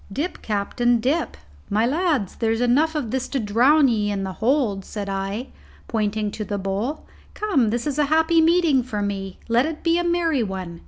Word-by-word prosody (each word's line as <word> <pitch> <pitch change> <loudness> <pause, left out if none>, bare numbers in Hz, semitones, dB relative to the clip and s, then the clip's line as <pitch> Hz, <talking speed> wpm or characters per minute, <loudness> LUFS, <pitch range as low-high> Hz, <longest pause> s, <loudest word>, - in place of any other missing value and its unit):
"Dip, 300 - -4
captain, 230 +3 0
dip, 285 +8 -1 0.3
my 215 +3 +2
lads; 290 - 0
there's 225 -1 0
enough 280 +7 +2
of 260 -8 -2
this 265 -1 -2
to 275 - -2
drown 255 +8 +4
ye 215 -4 +1
in 200 -1 -2
the 190 -1 -4
hold," 225 -4 0
said 205 0 -6
I, 195 +5 -3 0.4
pointing 215 -2 -1
to 215 - -5
the 205 -1 -3
bowl. 200 +9 -3 0.3
"Come, 305 - +1
this 235 +2 -2
is 295 -1 -2
a 295 - +4
happy 320 +2 +3
meeting 325 -4 +4
for 215 -4 -4
me; 195 -2 -4
let 240 +4 +2
it 320 -1 -6
be 335 0 +2
a - - 0
merry 340 -5 +1
one. 185 -5 -5
240 Hz, 195 wpm, -23 LUFS, 205-300 Hz, 0.4 s, drown